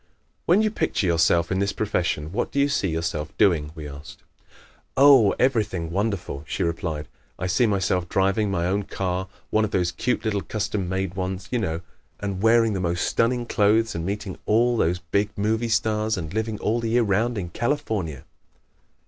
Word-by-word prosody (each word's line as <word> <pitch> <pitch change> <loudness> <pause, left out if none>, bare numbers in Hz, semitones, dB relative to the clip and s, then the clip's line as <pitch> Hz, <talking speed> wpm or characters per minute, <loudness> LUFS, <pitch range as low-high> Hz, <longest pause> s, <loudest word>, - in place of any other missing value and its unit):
"When 190 +6 +5
you 215 - +1
picture 160 - -1
yourself 85 0 +2
in 95 - +1
this 100 0 0
profession 85 -7 -1
what 100 - -2
do 140 - -1
you 140 +1 +3
see 140 -9 0
yourself 80 -2 -2
doing?" 75 -6 +3
we 75 -2 -7
asked. 70 +1 -11 0.7
"Oh, 135 -6 +7
everything 105 -10 0
wonderful," 100 -7 -2
she - - -2
replied. 80 -3 -3 0.3
"I 90 - -3
see 105 +6 +2
myself 90 -3 0
driving 100 +2 +1
my 85 -3 0
own 100 +3 +1
car 95 -1 -3 0.2
one 110 - +3
of 105 - 0
those 90 -3 0
cute 125 +8 -1
little 105 -2 0
custom 100 0 -3
made 95 -1 -2
ones, 95 +1 -4
you 125 - +1
know 85 -6 -2 0.4
and 100 -2 -3
wearing 115 0 +4
the 95 - -2
most 85 -1 0
stunning 120 +1 +1
clothes 110 +1 +2
and 85 - -4
meeting 100 +1 -4
all 120 +3 +3
those 90 -5 +1
big 100 +5 -1
movie 110 +3 0
stars 110 0 +1
and 80 -1 -5
living 110 0 -2
all 115 +3 0
the 115 -1 -2
year 120 +1 +3
round 110 +3 +1
in 90 -4 -3
California!" 105 - -2
100 Hz, 180 wpm, -24 LUFS, 90-110 Hz, 0.7 s, Oh